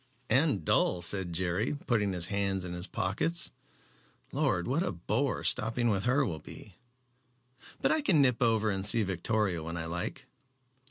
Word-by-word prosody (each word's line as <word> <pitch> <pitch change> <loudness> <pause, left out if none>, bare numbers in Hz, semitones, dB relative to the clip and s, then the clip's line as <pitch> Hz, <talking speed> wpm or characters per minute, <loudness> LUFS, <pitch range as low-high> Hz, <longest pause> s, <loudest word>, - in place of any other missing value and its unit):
"And 130 - +2
dull," 85 +3 +2
said 95 0 +1
Jerry, 95 - -1
putting 105 -5 +1
his 90 -2 0
hands 100 -1 -1
in 90 - -5
his 90 +2 -4
pockets. 160 - -1 0.8
"Lord! 130 - 0
what 140 +6 +1
a - - -1
bore 105 +10 -1
stopping 115 +2 +2
with 100 -3 0
her 130 +3 +3
will 80 -8 -4
be. 100 +6 -11 1.1
But - - +2
I 315 - +2
can 185 - +3
nip 125 -4 +3
over 110 -2 +2
and 95 -1 -2
see 110 +2 +4
Victoria 95 -1 -1
when 85 +2 -5
I 80 - -3
like." 85 +1 -4
100 Hz, 165 wpm, -30 LUFS, 90-120 Hz, 1.1 s, see